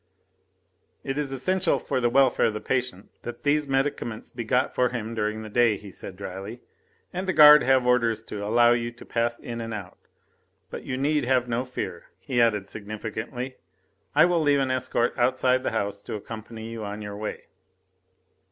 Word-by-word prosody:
"It 135 Hz, +1 st, -2 dB
is 145 Hz, -2 st, -2 dB
essential 170 Hz, +4 st, +1 dB
for 130 Hz, -, -2 dB
the 120 Hz, -, +3 dB
welfare 135 Hz, +1 st, +4 dB
of 110 Hz, -, -2 dB
the -, -, -2 dB
patient 120 Hz, -4 st, -2 dB
that 120 Hz, -, -8 dB
these 150 Hz, 0 st, +2 dB
medicaments 135 Hz, -4 st, -2 dB
be 120 Hz, -, -5 dB
got 125 Hz, +3 st, +1 dB
for 125 Hz, -1 st, +2 dB
him 115 Hz, -2 st, -4 dB
during 110 Hz, 0 st, -2 dB
the -, -, -7 dB
day," 115 Hz, -2 st, +3 dB
he 100 Hz, -1 st, -11 dB
said 95 Hz, +1 st, -8 dB
dryly, 100 Hz, +4 st, -7 dB, 0.5 s
"and 185 Hz, +1 st, -3 dB
the 185 Hz, -, +1 dB
guard 150 Hz, -1 st, +9 dB
have 130 Hz, -1 st, +3 dB
orders 115 Hz, -3 st, +2 dB
to 105 Hz, -2 st, -6 dB
allow 120 Hz, +3 st, +4 dB
you 120 Hz, 0 st, 0 dB
to 120 Hz, -, -14 dB
pass 120 Hz, 0 st, -1 dB
in 115 Hz, -1 st, -6 dB
and 115 Hz, -1 st, -4 dB
out. 95 Hz, -4 st, -8 dB, 0.7 s
But -, -, -7 dB
you 130 Hz, -, -3 dB
need 145 Hz, 0 st, +1 dB
have 125 Hz, -1 st, +2 dB
no 120 Hz, +1 st, -1 dB
fear," 125 Hz, -, -5 dB
he 120 Hz, -2 st, 0 dB
added 105 Hz, -4 st, +2 dB
significantly, 110 Hz, +5 st, -6 dB, 0.6 s
"I -, -, +7 dB
will 175 Hz, -2 st, +2 dB
leave 145 Hz, -2 st, +3 dB
an 135 Hz, -1 st, 0 dB
escort 130 Hz, -2 st, 0 dB
outside 130 Hz, +1 st, +3 dB
the -, -, -1 dB
house 100 Hz, -2 st, -2 dB
to 105 Hz, -, -6 dB
accompany 110 Hz, +1 st, -8 dB
you 115 Hz, -1 st, -6 dB
on 105 Hz, +1 st, -5 dB
your 105 Hz, 0 st, -6 dB
way." 105 Hz, +1 st, -5 dB
120 Hz, 190 wpm, -26 LUFS, 110-130 Hz, 0.7 s, guard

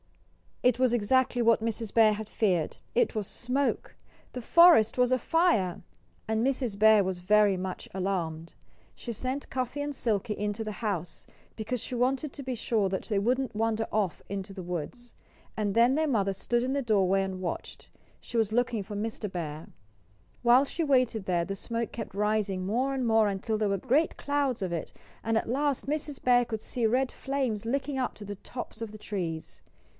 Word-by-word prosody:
It 250 Hz, -1 st, +4 dB
was 255 Hz, -2 st, +3 dB
exactly 245 Hz, +2 st, +2 dB
what 230 Hz, -1 st, +4 dB
Mrs. 225 Hz, -1 st, -3 dB
Bear 220 Hz, -2 st, +6 dB
had 210 Hz, 0 st, -6 dB
feared 180 Hz, -7 st, 0 dB, 0.2 s
it 480 Hz, -2 st, +3 dB
was 215 Hz, -4 st, -3 dB
smoke! 265 Hz, +3 st, -2 dB, 0.4 s
The 250 Hz, -, -5 dB
forest 335 Hz, -5 st, +6 dB
was 250 Hz, 0 st, +3 dB
afire! 255 Hz, -, +2 dB, 0.5 s
And 220 Hz, +2 st, +1 dB
Mrs. 255 Hz, -6 st, -1 dB
Bear 215 Hz, -1 st, +6 dB
was 185 Hz, -1 st, -3 dB
very 205 Hz, +1 st, +4 dB
much 185 Hz, 0 st, -5 dB
alarmed. 170 Hz, -4 st, -3 dB, 0.4 s
She 240 Hz, -, -6 dB
sent 255 Hz, +5 st, -4 dB
Cuffy 255 Hz, +2 st, -2 dB
and 290 Hz, 0 st, -3 dB
Silkie 215 Hz, -3 st, -1 dB
into 210 Hz, +2 st, -2 dB
the 215 Hz, -, -4 dB
house, 185 Hz, -7 st, -4 dB, 0.3 s
because 230 Hz, +2 st, -3 dB
she -, -, -7 dB
wanted 265 Hz, +4 st, 0 dB
to 280 Hz, -, -8 dB
be 260 Hz, -1 st, -3 dB
sure 215 Hz, -3 st, 0 dB
that 190 Hz, -, -3 dB
they 210 Hz, -, -1 dB
wouldn't 250 Hz, +3 st, 0 dB
wander 225 Hz, 0 st, 0 dB
off 205 Hz, -6 st, -1 dB
into 195 Hz, 0 st, -5 dB
the 190 Hz, -2 st, -7 dB
woods. 180 Hz, +8 st, -6 dB, 0.4 s
And 205 Hz, -2 st, -1 dB
then 235 Hz, +3 st, +5 dB
their 315 Hz, +2 st, +1 dB
mother 200 Hz, -7 st, +1 dB
stood 240 Hz, +5 st, 0 dB
in 260 Hz, +1 st, -1 dB
the 280 Hz, -, 0 dB
doorway 195 Hz, -5 st, +2 dB
and 190 Hz, -1 st, -5 dB
watched. 175 Hz, -, -5 dB, 0.3 s
She 240 Hz, -, -6 dB
was 220 Hz, -2 st, +2 dB
looking 240 Hz, -1 st, +1 dB
for 205 Hz, +2 st, -7 dB
Mr. 210 Hz, -1 st, -3 dB
Bear. 155 Hz, -3 st, -5 dB, 0.7 s
While 250 Hz, +3 st, +5 dB
she 330 Hz, +4 st, -3 dB
waited 255 Hz, -8 st, +2 dB
there 175 Hz, -2 st, +1 dB
the 195 Hz, -, -4 dB
smoke 230 Hz, +3 st, -3 dB
kept 225 Hz, -, -7 dB
rising 205 Hz, -2 st, 0 dB
more 250 Hz, +7 st, 0 dB
and 260 Hz, -2 st, -1 dB
more 220 Hz, -2 st, +4 dB
until 205 Hz, +2 st, -1 dB
there 210 Hz, -1 st, 0 dB
were 195 Hz, -, +1 dB
great 280 Hz, -, +1 dB
clouds 280 Hz, -6 st, -1 dB
of 180 Hz, -2 st, -2 dB
it; 165 Hz, -, -4 dB, 0.3 s
and 225 Hz, 0 st, +1 dB
at 225 Hz, -, -2 dB
last 280 Hz, +2 st, 0 dB
Mrs. 290 Hz, 0 st, -3 dB
Bear 245 Hz, -1 st, +5 dB
could 220 Hz, -2 st, -4 dB
see 235 Hz, -3 st, -1 dB
red 255 Hz, +3 st, +1 dB
flames 260 Hz, -6 st, -2 dB
licking 270 Hz, +3 st, -1 dB
up 255 Hz, -, -2 dB
to 210 Hz, -, -9 dB
the 205 Hz, 0 st, -5 dB
tops 240 Hz, 0 st, -8 dB
of 225 Hz, -2 st, -4 dB
the 215 Hz, -, -9 dB
trees. 170 Hz, -7 st, -5 dB
225 Hz, 190 wpm, -28 LUFS, 200-255 Hz, 0.7 s, Bear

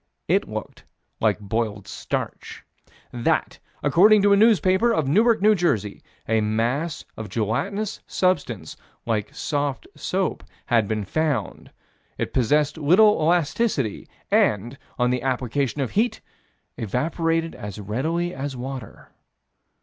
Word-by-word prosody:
It -, -, +1 dB
looked -, -, -7 dB, 0.4 s
like -, -, +2 dB
boiled 105 Hz, -1 st, -3 dB
starch: -, -, -5 dB, 0.5 s
That, 120 Hz, -1 st, 0 dB, 0.2 s
according 210 Hz, +3 st, +5 dB
to 200 Hz, 0 st, +5 dB
a -, -, +7 dB
newspaper, 205 Hz, +1 st, +4 dB
of 160 Hz, -11 st, 0 dB
Newark, 220 Hz, -, +3 dB
N.J., 170 Hz, -, +2 dB, 0.3 s
a 110 Hz, 0 st, +2 dB
mass 120 Hz, +9 st, -1 dB
of 110 Hz, -2 st, -7 dB
gelatinous 155 Hz, -, -2 dB
substance, 140 Hz, -, -1 dB, 0.3 s
like 110 Hz, -3 st, -1 dB
soft 145 Hz, -3 st, -2 dB
soap, 190 Hz, 0 st, -2 dB, 0.2 s
had 115 Hz, -5 st, +2 dB
been 105 Hz, -1 st, -2 dB
found. 145 Hz, -, -2 dB, 0.5 s
"It -, -, -3 dB
possessed 145 Hz, +5 st, +2 dB
little 190 Hz, +8 st, +6 dB
elasticity, 160 Hz, -, 0 dB, 0.2 s
and, 115 Hz, +6 st, +2 dB, 0.2 s
on 125 Hz, 0 st, +2 dB
the 125 Hz, -1 st, 0 dB
application 135 Hz, +2 st, -1 dB
of 130 Hz, -, -2 dB
heat, 230 Hz, +4 st, +1 dB, 0.6 s
it -, -, -3 dB
evaporated 165 Hz, -, -1 dB
as 105 Hz, -2 st, -8 dB
readily 155 Hz, -, -2 dB
as 135 Hz, 0 st, -5 dB
water." 130 Hz, -2 st, -8 dB
140 Hz, 120 wpm, -23 LUFS, 115-175 Hz, 0.6 s, a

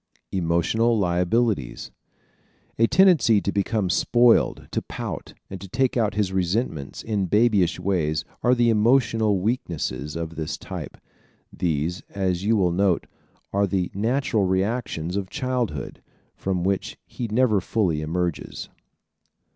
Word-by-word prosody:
Emotional 95 Hz, +7 st, +1 dB
Liabilities 90 Hz, -, 0 dB, 0.9 s
¶ -, -, +4 dB
A -, -, +6 dB
tendency 165 Hz, -, +5 dB
to 100 Hz, -, -2 dB
become 100 Hz, 0 st, 0 dB
spoiled, 120 Hz, +6 st, +3 dB
to -, -, -1 dB
pout, -, -, -6 dB
and 95 Hz, -2 st, -8 dB
to 95 Hz, -, -9 dB
take 130 Hz, +5 st, 0 dB
out 110 Hz, -5 st, +1 dB
his 100 Hz, -3 st, 0 dB
resentments 90 Hz, -, -2 dB
in 105 Hz, -4 st, -1 dB
babyish 105 Hz, -3 st, +3 dB
ways 80 Hz, -6 st, 0 dB, 0.2 s
are 125 Hz, +1 st, +4 dB
the 120 Hz, -1 st, +3 dB
emotional 110 Hz, -2 st, +3 dB
weaknesses 80 Hz, -, -2 dB
of 85 Hz, 0 st, -5 dB
this 80 Hz, -1 st, -3 dB
type. -, -, -7 dB, 0.6 s
These, 85 Hz, +1 st, -1 dB
as 95 Hz, -2 st, -1 dB
you 110 Hz, +2 st, +2 dB
will 90 Hz, -3 st, +2 dB
note, 95 Hz, 0 st, +1 dB, 0.5 s
are 100 Hz, +1 st, +2 dB
the 90 Hz, -1 st, -1 dB
natural 115 Hz, 0 st, 0 dB
reactions 95 Hz, -3 st, -1 dB
of 100 Hz, -2 st, -3 dB
childhood, 125 Hz, -, -3 dB, 0.3 s
from 95 Hz, -2 st, -2 dB
which 95 Hz, +1 st, -1 dB
he 120 Hz, -, -5 dB
never 110 Hz, -2 st, +2 dB
fully 90 Hz, -6 st, 0 dB
emerges. 85 Hz, +1 st, -3 dB
100 Hz, 130 wpm, -24 LUFS, 90-115 Hz, 0.9 s, A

